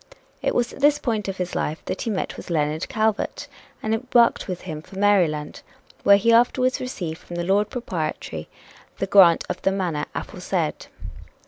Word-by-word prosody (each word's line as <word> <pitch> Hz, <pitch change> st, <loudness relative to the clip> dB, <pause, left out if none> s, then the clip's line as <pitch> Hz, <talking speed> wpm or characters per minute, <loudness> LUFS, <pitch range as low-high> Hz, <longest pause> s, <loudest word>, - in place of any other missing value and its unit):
It -, -, 0 dB
was 240 Hz, -1 st, 0 dB
at -, -, -11 dB
this 290 Hz, +1 st, +5 dB
point 225 Hz, -8 st, -2 dB
of 195 Hz, -1 st, -4 dB
his 180 Hz, -1 st, -3 dB
life 155 Hz, +2 st, -3 dB
that 185 Hz, -, -4 dB
he -, -, -2 dB
met 200 Hz, -4 st, -2 dB
with -, -, -10 dB
Leonard 155 Hz, -1 st, -1 dB
Calvert, 220 Hz, -1 st, -1 dB, 0.4 s
and 220 Hz, -, 0 dB
embarked 235 Hz, 0 st, +2 dB
with 180 Hz, -2 st, -4 dB
him 155 Hz, -4 st, -6 dB
for 190 Hz, +4 st, -13 dB
Maryland, 180 Hz, -7 st, +2 dB, 0.4 s
where 200 Hz, 0 st, +7 dB
he 230 Hz, +3 st, +3 dB
afterwards 255 Hz, +2 st, +3 dB
received 175 Hz, -10 st, -5 dB
from 175 Hz, -, -10 dB
the 175 Hz, -, -2 dB
Lord 200 Hz, +3 st, +2 dB
Proprietary 245 Hz, +1 st, -4 dB, 0.5 s
the -, -, -1 dB
grant 190 Hz, -4 st, +6 dB
of -, -, -4 dB
the 195 Hz, -, +2 dB
manor 175 Hz, -6 st, -2 dB
"aforesaid." -, -, -3 dB
195 Hz, 180 wpm, -23 LUFS, 175-230 Hz, 0.5 s, where